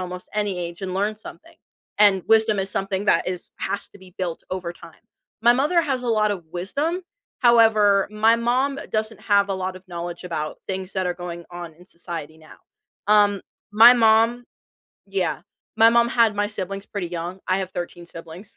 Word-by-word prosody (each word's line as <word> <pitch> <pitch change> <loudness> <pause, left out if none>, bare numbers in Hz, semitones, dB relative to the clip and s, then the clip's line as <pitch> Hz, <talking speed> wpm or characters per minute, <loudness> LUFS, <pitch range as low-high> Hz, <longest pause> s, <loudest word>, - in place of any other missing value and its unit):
almost 180 0 -7
any 205 -3 -1
age 170 +1 -6
and 185 -1 -4
learn 205 +3 0
something. 215 - -13 0.4
And, 200 -3 +5
wisdom 220 -1 +4
is 195 0 -1
something 195 +1 -2
that 170 - +3
is 180 -1 -5
has 200 - -4
to - - -16
be 185 -2 -17
built 175 -3 -3
over 185 -2 -4
time. 170 -2 -15 0.4
My 240 +1 +6
mother 300 +7 +2
has 270 -6 -2
a 245 - -3
lot 215 -2 +2
of 190 -4 -4
wisdom, 280 - -3 0.4
however, 220 -5 +5
my 220 +2 +3
mom 255 +4 0
doesn't 220 0 -2
have 200 -1 +2
a - - 0
lot 185 0 -4
of 185 +1 -15
knowledge 175 0 -6
about 155 -3 -4
things 190 0 -5
that 190 -1 -1
are 180 - -1
going 175 -1 -7
on 175 -1 -8
in 180 +3 -19
society 165 -3 -8
now, 155 -1 -16 0.5
um, 205 -1 +4 0.3
my 225 +3 +9
mom 230 +1 +3 0.6
Yeah, 190 -4 -2 0.4
my 225 0 +7
mom 235 0 +3
had 230 -3 +3
my 205 0 0
siblings 195 -1 -5
pretty 200 -4 -4
young, 175 +2 -5
I 185 0 +2
have 190 -1 -4
13 175 -1 -6
siblings. 170 +4 -11
195 Hz, 190 wpm, -23 LUFS, 180-220 Hz, 0.6 s, my